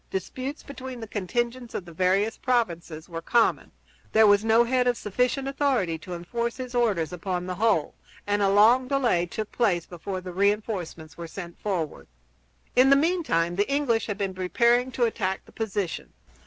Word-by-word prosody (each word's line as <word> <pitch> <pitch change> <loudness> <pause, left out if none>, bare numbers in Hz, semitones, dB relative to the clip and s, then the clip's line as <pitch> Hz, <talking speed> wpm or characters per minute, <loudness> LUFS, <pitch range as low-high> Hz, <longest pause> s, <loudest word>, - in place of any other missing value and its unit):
Disputes 255 - -5
between 260 -3 -8
the 225 - -7
contingents 235 +5 -3
of 185 - -4
the 170 - -11
various 190 +5 +1
provinces 170 -10 -1
were 165 -2 -6
common; 235 +6 +2 0.4
there 220 0 +6
was 205 0 +5
no 225 +1 +5
head 250 +1 +1
of 245 -1 +2
sufficient 250 +6 -1
authority 265 - 0
to 180 +2 -7
enforce 235 +8 -3
his 255 -1 -6
orders 205 -9 +1
upon 180 0 -3
the 185 - -3
whole; 200 -5 +1 0.3
and 205 0 0
a 200 - +3
long 225 +6 +5
delay 250 -11 +1
took 215 +4 -5
place 185 -8 +1
before 185 +2 -5
the 180 -1 -8
re 200 +3 +4
enforcements 180 -7 -6
were 170 - -5
sent 170 0 -9
forward. 180 -7 -3 0.7
In 255 +2 +6
the 275 - +7
meantime 275 - +1
the 205 +7 +1
English 275 -6 +1
had 205 -2 -3
been 195 -2 -2
preparing 235 +7 +2
to 245 - 0
attack 190 -4 -2
the - - -17
position. 205 -5 -3
210 Hz, 180 wpm, -26 LUFS, 180-245 Hz, 0.7 s, the